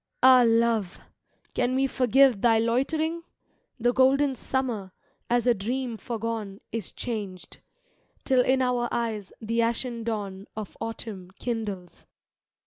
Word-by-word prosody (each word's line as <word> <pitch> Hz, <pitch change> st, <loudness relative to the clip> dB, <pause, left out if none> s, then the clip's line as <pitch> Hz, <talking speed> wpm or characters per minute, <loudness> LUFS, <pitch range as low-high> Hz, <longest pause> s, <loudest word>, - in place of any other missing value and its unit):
Ah, 255 Hz, -1 st, +8 dB
Love, 225 Hz, -4 st, +2 dB, 0.5 s
can 255 Hz, +1 st, +1 dB
we 270 Hz, +1 st, +3 dB
forgive 260 Hz, -3 st, +4 dB
thy 230 Hz, -2 st, +5 dB
loitering?... 310 Hz, +9 st, 0 dB, 0.6 s
The 245 Hz, +1 st, +2 dB
golden 270 Hz, +2 st, +4 dB
Summer, 235 Hz, -8 st, -3 dB, 0.4 s
as 240 Hz, 0 st, +2 dB
a 245 Hz, -, +5 dB
dream 235 Hz, +4 st, -3 dB
forgone. 220 Hz, -2 st, -4 dB
Is 225 Hz, -3 st, -4 dB
changed,— 205 Hz, -6 st, -6 dB, 0.7 s
till 260 Hz, -2 st, +4 dB
in 260 Hz, +1 st, +2 dB
our 245 Hz, -1 st, +1 dB
eyes 220 Hz, -4 st, -2 dB
the 230 Hz, +1 st, 0 dB
ashen 235 Hz, 0 st, -1 dB
dawn 205 Hz, -3 st, -4 dB
Of 215 Hz, -3 st, -6 dB
autumin 220 Hz, -5 st, -6 dB
kindles. 210 Hz, -7 st, -5 dB
230 Hz, 125 wpm, -26 LUFS, 215-255 Hz, 0.7 s, Ah